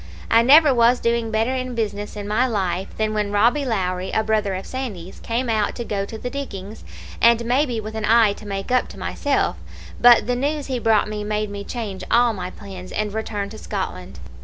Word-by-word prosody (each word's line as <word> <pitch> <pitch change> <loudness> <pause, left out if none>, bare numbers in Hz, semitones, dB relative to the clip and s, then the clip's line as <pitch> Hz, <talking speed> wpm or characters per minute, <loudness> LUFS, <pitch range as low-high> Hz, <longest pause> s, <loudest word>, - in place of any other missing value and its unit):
I 230 - +6
never 285 +4 +7
was 240 +1 +4
doing 235 -1 0
better 225 +3 0
in 255 -1 -3
business 210 -2 -3
in 205 -1 -6
my 225 +5 +2
life 190 -5 -1
than 215 0 0
when 210 -1 -1
Robbie 235 +8 +3
Lowrie, 185 -5 -1
a 220 - +1
brother 215 -3 0
of 190 - -6
Sandy's, 210 -9 -6
came 240 +2 -2
out 215 -2 0
to 240 - -4
go 200 -2 -2
to 220 - -8
the 245 +3 -5
diggings, 215 -7 -7 0.4
and 235 0 +5
maybe 250 -1 +1
with 215 0 -6
an 220 -1 -3
eye 225 -2 +5
to 210 - -12
make 195 +2 -4
up 255 - +2
to - - -12
myself; 285 -2 -1 0.4
but 240 -1 +7
the 245 - 0
news 290 +3 -1
he 260 -2 -2
brought 220 -3 +3
me 210 0 -4
made 210 0 -2
me 200 0 -6
change 210 -4 -5
all 240 -1 +4
my 180 -3 -5
plans 185 -1 -10
and 210 -1 -2
return 210 -2 -3
to 220 +1 -10
Scotland. 185 - -5
220 Hz, 210 wpm, -22 LUFS, 205-240 Hz, 0.4 s, never